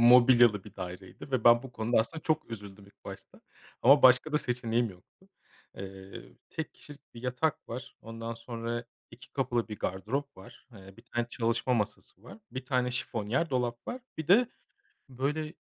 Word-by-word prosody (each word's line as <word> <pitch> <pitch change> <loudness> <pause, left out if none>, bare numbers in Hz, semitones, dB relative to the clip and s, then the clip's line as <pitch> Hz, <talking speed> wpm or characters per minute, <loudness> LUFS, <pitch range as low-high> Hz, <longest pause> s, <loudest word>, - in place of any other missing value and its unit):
Mobilyalı 120 -3 +7
bir - - -13
daireydi 90 +8 -8
ve 130 -4 0
ben 120 0 +7
bu 130 -2 -10
konuda 115 +1 +1
aslında 155 +8 -4
çok 155 -5 0
üzüldüm 100 -2 -8
ilk 100 - -23
başta - - -10 0.4
ama 140 +3 +7
başka 130 +4 +6
da 150 - +4
seçeneğim 120 -3 0
yoktu. 90 -1 -20 0.5
Iıı, 95 0 -9
tek 160 - -5
kişilik 145 -1 -15
bir 115 - -10
yatak 125 +5 -1
var, 120 +1 -7
ondan 115 0 -6
sonra 115 +1 -4 0.3
2 125 +2 -15
kapılı 120 -4 0
bir 105 - -6
gardırop 130 +10 -2
var. 115 +7 -15
Iıı, 95 -3 -13
1 115 - -15
tane 120 0 -2
çalışma 120 +1 0
masası 105 -3 -3
var. 125 - -12
1 130 0 -5
tane 125 -2 +1
şifonyer 125 +4 -1
dolap 120 -2 -1
var. 250 +1 -4 0.2
Bir 160 - -4
de, 225 +6 +6 0.6
böyle, 150 +5 -2
120 Hz, 170 wpm, -30 LUFS, 115-130 Hz, 0.6 s, Mobilyalı